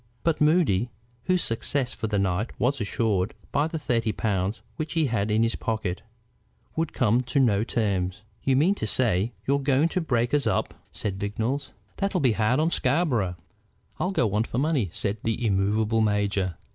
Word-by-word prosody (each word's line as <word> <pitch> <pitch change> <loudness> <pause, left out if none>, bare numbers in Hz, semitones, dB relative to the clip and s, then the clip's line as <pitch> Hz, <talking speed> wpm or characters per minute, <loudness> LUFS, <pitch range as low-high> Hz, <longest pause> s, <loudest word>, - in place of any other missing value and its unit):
But 165 -2 +1
Moody, 150 - +3 0.4
whose 185 -1 +2
success 125 +3 -1
for 110 - -3
the 105 -1 0
night 100 +3 -1
was 130 +1 +1
assured 105 -1 0 0.2
by 145 +2 +2
the 160 - -4
thirty 115 -7 0
pounds 100 -1 -1
which 155 0 -4
he 165 -2 +2
had 110 -5 0
in 110 +2 +3
his 115 0 +1
pocket, 110 -5 -2 0.7
would 165 -1 -1
come 120 0 +2
to 130 +3 0
no 110 -6 +3
terms. 100 -5 -1 0.2
"You 135 - +2
mean 160 +9 +4
to 110 - -3
say 110 -2 +2
you're 140 +1 +2
going 140 +3 +2
to 185 - -1
break 120 -6 0
us 145 -1 +2
up," - - 0 0.2
said 100 -2 -2
Vignolles. 110 +8 -2 0.3
"That'll 195 -1 0
be 130 -6 +3
hard 110 +4 +2
on 160 +2 +2
Scarborough." 125 - +1 0.6
"I'll 180 - 0
go 125 - +1
on 105 +2 +2
for 120 - -5
money," 140 - +1
said 100 +3 -2
the 115 +1 -1
immovable 105 +2 +2
major. 100 -4 0
115 Hz, 180 wpm, -26 LUFS, 105-140 Hz, 0.7 s, mean